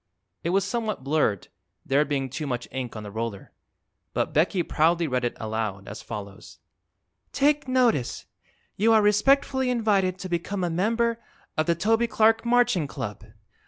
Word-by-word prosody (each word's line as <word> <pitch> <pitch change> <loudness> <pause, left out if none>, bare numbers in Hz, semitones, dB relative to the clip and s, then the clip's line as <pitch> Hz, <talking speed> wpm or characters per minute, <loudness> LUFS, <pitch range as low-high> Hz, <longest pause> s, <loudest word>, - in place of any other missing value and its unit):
It 170 - -1
was 195 +2 +2
somewhat 215 - -3
blurred, 135 - 0 0.4
there 140 +2 +3
being 140 -2 -1
too 145 +4 -5
much 120 -2 -3
ink 125 -3 -5
on 110 - -6
the 105 - -8
roller, 110 -2 -5 0.6
but - - -1
Becky 175 +3 +2
proudly 165 +1 +2
read 125 -2 -1
it 120 - -2
aloud, 110 -3 -3
as 105 - -7
follows: 100 -3 -9 0.8
TAKE 290 0 +2
NOTICE! 245 - +1 0.5
You 225 +3 +4
are 220 - +6
respectfully 265 +5 +3
invited 205 -6 +1
to 185 - -6
become 180 +2 -2
a 175 - 0
Member 230 +6 +1 0.4
of 155 - 0
THE 170 - +3
TOBY 225 +6 +2
CLARK 225 0 +3
MARCHING 240 -10 +3
CLUB! 105 -7 -6
175 Hz, 160 wpm, -25 LUFS, -, 0.8 s, are